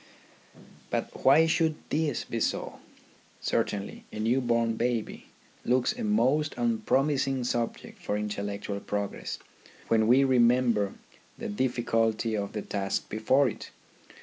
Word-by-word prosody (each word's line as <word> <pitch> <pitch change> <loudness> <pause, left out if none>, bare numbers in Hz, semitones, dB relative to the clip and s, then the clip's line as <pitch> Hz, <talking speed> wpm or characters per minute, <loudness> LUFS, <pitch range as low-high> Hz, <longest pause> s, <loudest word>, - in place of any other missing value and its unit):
But - - -3
why 145 +5 +7
should 160 -1 +2 0.2
this 155 0 0
be 115 - -4
so? - - -2 0.6
Certainly, 100 0 -2
a - - -8
new 115 +5 +1
born 115 -2 +1
baby 120 -1 -2 0.4
looks 125 - +2
a 240 +1 -6
most 155 -8 +2
unpromising 140 - +1
subject 120 -1 -3
for 105 - -1
intellectual 100 -1 -3
progress 100 0 -4 0.5
when 110 -1 +3
we 130 +4 +6
remember 120 -5 +3 0.4
the - - -5
difficulty 115 -1 0
of 100 -1 -3
the 105 - -3
task 95 -1 -2
before 130 +6 +3
it. 115 - -6
120 Hz, 120 wpm, -28 LUFS, 105-135 Hz, 0.6 s, why